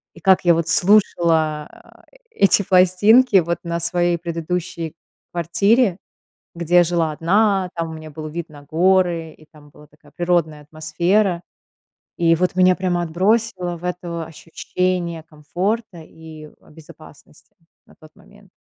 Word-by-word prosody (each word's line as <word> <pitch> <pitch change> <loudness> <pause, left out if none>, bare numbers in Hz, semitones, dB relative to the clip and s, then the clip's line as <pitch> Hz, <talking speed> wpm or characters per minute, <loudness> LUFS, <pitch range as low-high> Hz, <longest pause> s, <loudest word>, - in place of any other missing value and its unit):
И - - -14
как 190 +2 +3
я 170 - +5
вот 165 -1 -2
слушала 165 -6 +2
а - - -20
э - - -27 0.2
эти 200 - +3
пластинки 200 +6 +4
вот 170 -1 0
на 170 -1 -3
своей 175 +1 0
предыдущей 170 -1 -5 0.4
квартире, 180 +5 +1 0.6
где 175 +1 +3
жила 170 -2 -1
одна, 190 +4 +1
там 165 -1 -4
у - - -8
меня 155 0 -10
был 155 +1 -7
вид 165 +1 -6
на 145 -2 -14
горы 170 0 +1
и 155 - -20
там 150 -2 -19
была 150 +1 -18
такая 150 -1 -23
природная 170 -4 -1
атмосфера. 170 +5 -1 0.7
И 165 -1 +3
вот 180 +1 -1
меня 185 0 +4
прямо 180 -2 -1
отбросило 185 +1 -1
в 170 - -14
это 175 -2 -5
ощущение 170 +1 -4
комфорта 175 +7 -4
и 155 -1 -13
в - - -21
безопасности 155 -1 -17 0.3
на - - -21
тот 155 -1 -16
момент. 205 0 -21
170 Hz, 145 wpm, -20 LUFS, 160-185 Hz, 0.7 s, я